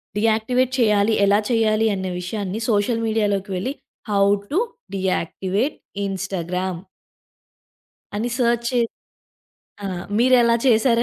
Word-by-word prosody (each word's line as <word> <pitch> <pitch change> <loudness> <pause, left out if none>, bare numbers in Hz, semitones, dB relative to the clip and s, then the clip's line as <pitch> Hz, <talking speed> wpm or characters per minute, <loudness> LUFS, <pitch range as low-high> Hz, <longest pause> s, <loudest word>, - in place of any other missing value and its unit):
Deactivate 225 +4 +1
చేయాలి. 210 -1 +3
ఎలా 200 +1 +4
చేయాలి? 225 -1 +2
అన్న 190 0 -3
విషయాన్ని 200 +2 -4
సోషల్ 225 +2 +1
మీడియాలోకి 205 -3 0
వెళ్ళి 255 +10 -2 0.4
"హౌ 200 -1 +3 0.3
టు 355 - +2 0.4
డియాక్టివేట్ 190 - -1 0.3
ఇన్‌స్టాగ్రామ్." 185 -2 -3 1.4
అని 230 +4 -1
సెర్చ్ 235 -1 +1
చే 250 -2 +1 1.1
ఆ! - - -1 0.3
మీరు 255 +2 +5
ఎలా 235 0 +4
చేశారా 235 0 +4
215 Hz, 110 wpm, -22 LUFS, 195-235 Hz, 1.4 s, మీరు